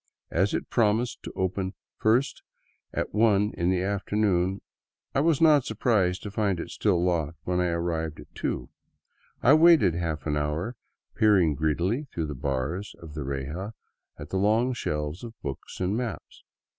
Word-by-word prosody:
As 95 +4 +2
it - - -4
promised 115 +1 +1
to - - -8
open 95 +1 -2 0.2
first 120 +6 +1 0.5
at - - -3
one 105 -1 +3
of 85 +1 0
the 90 -1 +1
afternoon, 100 -1 0 0.5
I - - +2
was 155 0 +3
not 155 -4 +6
surprised 105 -5 +1
to 105 - -5
find 100 -4 0
it - - -6
still 90 -5 +1
locked 85 -3 0
when 90 0 0
I 90 - +2
arrived 85 -2 -2
at - - -13
two. - - -3 0.7
I 130 - +7
waited 155 - +6
a 85 - -3
half 80 -4 -3
hour, 75 +9 -1 0.4
peering 95 -8 +4
greedily 85 - 0
through 80 - -2
the 75 - -4
bars 70 +8 -3
of 80 -2 -11
the 75 -2 -4
reja 70 +10 -4 0.4
at - - -9
the 95 - 0
long 110 +6 +2
shelves 75 -5 -3
of 115 -2 -9
books 70 -2 -6
and 95 +2 0
maps. 120 -3 -5
95 Hz, 165 wpm, -27 LUFS, 80-110 Hz, 0.7 s, I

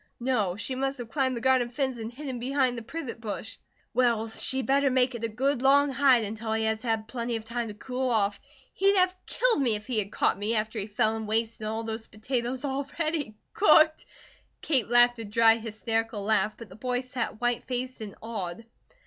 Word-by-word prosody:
"No. 230 -8 0
She 225 +5 -4
must 270 +1 -1
have 235 -2 -8
climbed 260 -4 0
the - - -5
garden 260 -1 +3
fence 260 -1 -2
and 225 +1 -5
hidden 260 -1 -6
behind 260 0 +1
the 235 - -5
privet 240 -2 -6
bush." 220 0 -6 0.3
"Well, 235 -2 +2
she 260 +4 0
better 275 +1 +3
make 255 0 +2
it 235 -1 -6
a - - +1
good 265 +4 0
long 280 +1 +5
hide, 265 -3 +4
until 220 +1 -3
he 220 0 0
has 220 0 0
had 225 -2 -1
plenty 235 0 -3
of 220 -1 -5
time 235 0 -3
to 210 - -7
cool 255 +3 -3
off. 205 -3 +2 0.3
He'd 395 +1 +3
have 365 0 +3
killed 480 -10 +2
me 235 -5 +2
if 210 0 -6
he 245 -4 0
had 200 -1 -3
caught 195 - +1
me, 215 +3 0
after 220 +1 -1
he 200 - -4
fell 215 +1 +1
and 220 -1 -5
wasted 220 0 -1
all 220 +1 -2
those 225 0 -5
potatoes 245 +4 -3
already 285 -1 -2 0.2
cooked 315 -5 +5 0.3
" - - -37
Kate 260 -8 +1
laughed 240 0 +5
a - - -4
dry 225 +1 +4
hysterical 225 -1 -2
laugh, 215 0 +1
but 230 -4 -10
the 185 - -12
boy 250 +3 -1
sat 250 -4 -4
white 240 -1 0
faced 255 -1 -3
and 205 -3 -7
awed. 220 -2 -5
235 Hz, 210 wpm, -27 LUFS, 220-260 Hz, 0.3 s, long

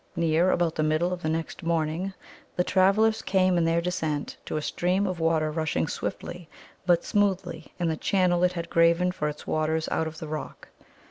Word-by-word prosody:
Near 170 +1 +2
about 175 -3 +1
the 155 - -2
middle 155 +4 +1
of 180 - -6
the 155 - -1
next 160 +3 -3
morning 165 +2 -1 0.4
the 180 - +2
travellers 200 +4 +3
came 185 -1 +2
in 170 -1 +2
their 165 +1 +2
descent 160 -4 -2
to - - -3
a - - -1
stream 185 +6 0
of 185 -3 -3
water 160 -1 +1
rushing 155 0 -1
swiftly 170 +2 -5 0.4
but 175 -1 +3
smoothly 195 -4 -1
in 175 -2 0
the 160 - 0
channel 180 -1 +2
it 180 0 +3
had 170 -1 -4
graven 170 +2 +4
for 150 -4 -2
its 150 - -9
waters 155 0 0
out 160 - 0
of 160 0 -8
the 160 -2 -7
rock. 155 0 -7
170 Hz, 195 wpm, -26 LUFS, 160-180 Hz, 0.4 s, graven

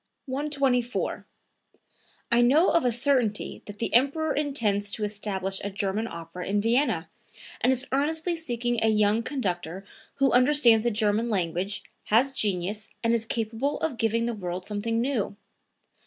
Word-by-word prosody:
124. 270 -3 -1 1.0
"I 235 0 +5
know 285 +9 +4
of 335 - +3
a 250 - +2
certainty 240 -3 +1
that 205 0 -9
the 230 - -3
Emperor 280 +6 +2
intends 220 -9 0
to 210 - -2
establish 195 -2 -2
a 200 - -2
German 200 +2 -2
opera 170 0 -7
in 205 +1 +1
Vienna, 240 +7 +1 0.5
and 250 - +4
is 260 +1 +2
earnestly 315 +5 0
seeking 240 -6 -2
a - - +4
young 215 +1 +3
conductor 190 - -3 0.3
who 275 -1 +2
understands 245 -3 +5
the - - +4
German 215 +1 +1
language, 190 +1 -1 0.2
has 245 +6 +3
genius 205 -3 0
and 230 0 +2
is 230 -1 0
capable 230 +5 -2
of 310 -7 -1
giving 230 0 +1
the 235 - -1
world 180 -3 -5
something 220 +2 -1
new. 240 -5 -1
230 Hz, 150 wpm, -26 LUFS, 205-260 Hz, 1.0 s, I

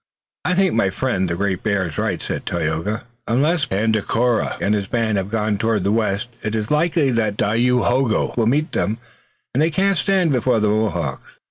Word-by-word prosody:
"I 180 - +1
think 190 0 +2
my 110 -4 +2
friend, 95 -3 -1
the 85 - -1
Great 95 0 -1
Bear, 100 -4 0
is 80 - -6
right," - - -1
said - - -5
Tayoga. 85 +7 -2 0.2
"Unless 145 +6 +1
Tandakora 110 +3 0
and 100 - +1
his 100 -2 -1
band 110 -2 0
have 95 +1 -4
gone 105 -2 -1
toward 110 -3 +1
the 100 - +1
west 105 -1 0
it 110 0 -2
is 110 +2 -2
likely 155 -2 +2
that 110 -3 0
Dayohogo 120 +2 +1
will 115 -2 +1
meet 150 +7 +1
them, 110 +2 -1 0.6
and 135 - +1
they 160 - +3
cannot 195 +4 +1
stand 185 -6 +2
before 125 -2 +2
the 105 -1 +2
Mohawks." 90 -10 -1
110 Hz, 190 wpm, -20 LUFS, 100-130 Hz, 0.6 s, they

